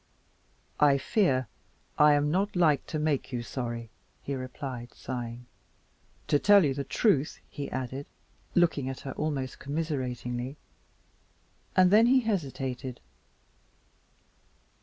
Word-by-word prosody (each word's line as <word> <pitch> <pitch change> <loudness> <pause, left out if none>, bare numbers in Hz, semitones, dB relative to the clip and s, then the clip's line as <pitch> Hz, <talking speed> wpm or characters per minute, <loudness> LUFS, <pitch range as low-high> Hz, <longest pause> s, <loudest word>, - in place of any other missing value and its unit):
"I 145 -2 +5
fear 135 - +1 0.5
I'm 150 0 +5
not 195 +4 0
like 160 -5 +3
to 155 - -3
make 150 -3 0
you 120 -2 -3
sorry," 115 -2 -5 0.3
he 140 - -3
replied, 130 -1 -6
sighing. 120 -1 -6 0.8
"To 145 - +3
tell 200 -1 +6
you 140 - +1
the 140 +1 -3
truth 155 - +1
" - - -34
he 145 - -3
added, 130 +2 -4 0.5
looking 160 -6 +2
at 135 - -6
her 135 - -5
almost 140 -3 -3
commiseratingly, 130 -4 -3 1.2
and 185 -1 +6
then 220 +3 +7
he 260 +1 +5
hesitated. 135 - -3
140 Hz, 115 wpm, -29 LUFS, 130-155 Hz, 1.2 s, then